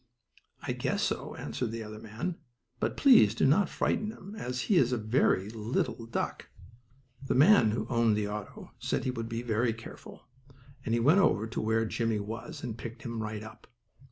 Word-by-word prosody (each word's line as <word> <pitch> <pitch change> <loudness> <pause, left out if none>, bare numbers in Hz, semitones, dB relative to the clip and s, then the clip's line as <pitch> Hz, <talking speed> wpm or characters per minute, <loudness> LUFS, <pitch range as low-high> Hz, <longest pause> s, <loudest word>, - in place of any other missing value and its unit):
"I - - -2
guess - - -1
so," - - -2
answered 125 - -3
the 115 0 -5
other 105 0 -8
man. 115 +12 -5 0.4
"But - - -1
please 115 - +6
do - - +2
not 170 +7 +4
frighten 210 - 0
him, 205 -2 -10
as 125 - -3
he 200 - +2
is 130 -6 +4
very 110 -3 +1
little." 115 +1 -2 1.2
The 135 - -1
man 145 - +6
who 110 +1 -1
owned 115 -3 +2
the 105 -1 -1
auto 105 0 -7
said - - -1
he 130 - 0
would 115 -2 -5
be 115 +1 -3 0.3
careful, 115 +1 -11 0.6
and 115 - 0
he - - +1
went 145 +11 +5
over 110 - +3
to 115 - -4
where 110 +1 +1
Jimmie 115 -1 -1
was, 115 +9 -6
and 115 -3 -5
picked 115 +1 -8
him 115 -2 -4
right 105 0 -4
up. 110 - -12
115 Hz, 180 wpm, -30 LUFS, 110-130 Hz, 1.2 s, please